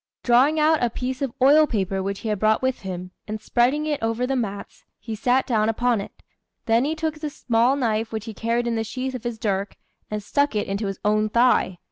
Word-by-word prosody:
Drawing 260 +6 +4
out 310 0 +3
a 240 - +2
piece 255 +3 -4
of 275 -3 -1
oil 300 +3 +6
paper 195 -5 -1
which 195 +1 -4
he 225 - -3
had 210 -2 -1
brought 215 +3 +2
with 260 -1 0
him, 185 -1 -6 0.2
and 215 +1 -4
spreading 250 +7 +1
it 300 -2 -2
over 225 +2 0
the 270 +1 -1
mats, 205 -5 -5
he 225 - -7
sat 250 +4 +1
down 220 -3 +1
upon 235 -1 +1
it; - - -12 0.4
then 230 +2 +3
he 310 +2 -1
took 315 -1 -3
the 305 -1 -3
small 240 -1 +1
knife 225 -4 -1
which 220 -1 -4
he 225 - -6
carried 230 +3 -1
in 235 - 0
the 225 -1 -1
sheath 255 +4 -4
of 250 -3 -6
his 240 -2 -3
dirk, 200 -3 -2 0.3
and 210 -1 -4
stuck 285 +3 0
it 210 - 0
into 200 +1 -2
his 195 -1 -4
own 215 +1 +2
thigh. 235 -5 +3
230 Hz, 230 wpm, -23 LUFS, 215-260 Hz, 0.4 s, oil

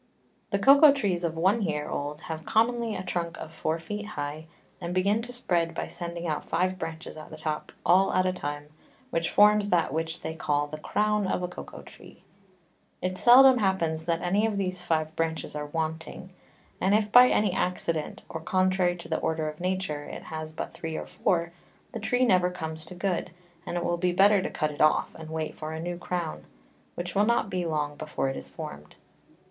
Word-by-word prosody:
The 200 - +1
Cocao 280 +7 +8
Trees 190 -10 -1
of 165 -1 -2
one 190 +7 +3
Year 150 -6 -1
old 145 +1 -4
have 160 -1 -6
commonly 230 +1 +1
a 185 - -4
Trunk 170 -2 -3
of 160 - -8
four 160 0 -1
Feet 205 +6 -6
high, 150 -4 -5 0.3
and 175 0 -4
begin 200 +4 +2
to 245 +2 -6
spread, 175 -9 0
by - - -3
sending 170 0 -5
out 155 -2 -2
five 185 +3 -1
Branches 160 0 -6
at 155 0 -10
the 155 - -9
top, 155 -1 -4
all 185 +3 +5
at 185 0 +2
a 185 - +1
time, 145 -3 -5 0.4
which 165 0 0
forms 210 0 +5
that 170 -6 +2
which 160 +1 -3
they 160 - -4
call 145 -2 0
the 155 +1 -8
Crown 210 +4 +1
of 180 - -1
a - - 0
Cocao 180 - -9
Tree. - - -15 0.8
It 185 0 -2
seldom 255 +1 +8
happens 165 -6 0
that 170 -1 0
any 200 +5 +2
of 210 -2 -2
these 185 -2 -2
five 160 -2 -1
Branches 165 -1 -2
are 150 0 -4
wanting, 160 +4 -4 0.5
and 195 +2 +4
if 210 -1 +1
by 250 +2 +9
any 210 -5 +2
Accident, 165 -4 -2
or 160 - -6
contrary 185 +1 +2
to 170 - -10
the 160 - -1
Order 160 -1 -1
of 150 - -10
Nature, 180 -5 -2
it - - -8
has 155 0 -6
but 155 - -6
three 160 -1 -5
or - - -5
four, 170 -2 0 0.4
the 230 - -5
Tree 245 +4 +2
never 185 -5 +4
comes 160 -3 -6
to 180 - -9
good, 180 -1 -1 0.4
and 175 - -2
it 175 - -2
will 175 - 0
be 180 +1 +1
better 200 +2 +5
to - - -2
cut 155 -1 -1
it 145 - -5
off, 155 0 +3
and 160 -1 -10
wait 160 -1 -3
for 155 0 -6
a 160 - -5
new 175 +1 -4
Crown, 175 -3 -4 0.5
which 175 0 -4
will 205 - +3
not 235 -3 +1
be 180 -2 -1
long 150 -2 -1
before 150 -3 -2
it 135 - -4
is - - -7
form'd. 75 +1 -9
175 Hz, 205 wpm, -27 LUFS, 160-195 Hz, 0.8 s, by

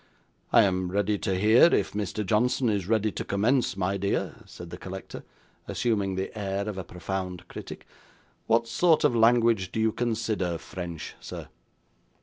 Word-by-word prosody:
'I - - +7
am 95 -2 0
ready 100 +1 0
to 95 - -1
hear, 110 - +6
if 170 - +2
Mr. 105 0 -3
Johnson 120 +5 +2
is 100 -4 -1
ready 110 -1 +2
to - - -4
commence, 110 +2 +1
my 95 +1 0
dear,' 100 +1 -1
said 85 -1 -10
the 90 - -6
collector, 95 0 -8 0.4
assuming 100 -5 0
the 95 +3 -4
air 100 -1 -2
of 100 -3 -4
a - - -4
profound 90 0 -5
critic. - - -9 0.6
'What 115 +1 +3
sort 160 +7 +3
of 120 - +3
language 115 -4 +4
do - - -3
you 110 0 +3
consider 110 -7 -1
French, 85 -3 -7
sir? - - -8
100 Hz, 160 wpm, -27 LUFS, 95-115 Hz, 0.6 s, I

